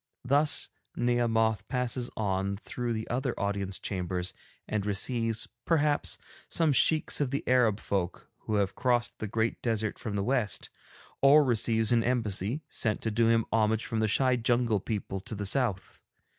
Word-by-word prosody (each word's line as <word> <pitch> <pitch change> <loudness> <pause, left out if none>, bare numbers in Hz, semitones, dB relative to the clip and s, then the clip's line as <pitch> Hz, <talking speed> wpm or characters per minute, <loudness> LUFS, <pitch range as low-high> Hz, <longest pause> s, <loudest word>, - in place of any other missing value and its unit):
Thus 145 +3 +3 0.3
Nehemoth 115 -3 +1
passes 125 -1 -1
on 100 -1 -1
through 120 +3 -4
the 110 -1 -3
other 125 +1 -2
Audience 100 -1 -2
Chambers 90 -2 -3 0.3
and 105 -2 -1
receives, 115 +2 0 0.2
perhaps, 150 -3 +2 0.3
some 160 -3 +2
Sheikhs 155 +3 +2
of 140 - +1
the 140 +2 -3
Arab 120 -5 +3
folk 95 -3 -3 0.2
who 110 - 0
have 100 -2 +1
crossed 120 -2 0
the 110 - -3
great 110 +2 -1
desert 110 -2 -1
from 105 -3 -4
the 100 - 0
West, 115 - -1 0.5
or 145 +2 +7
receives 115 -3 +2
an 115 -1 +4
embassy 115 - -1
sent 110 -3 -1
to 110 - -1
do 115 +2 +2
him 115 -1 +3
homage 110 0 +2
from 115 - -2
the 110 - +2
shy 130 +4 +3
jungle 120 -2 +2
people 100 -1 -4
to 100 +4 -7
the 105 0 -4
South. 100 -3 -1
115 Hz, 160 wpm, -29 LUFS, 105-125 Hz, 0.5 s, or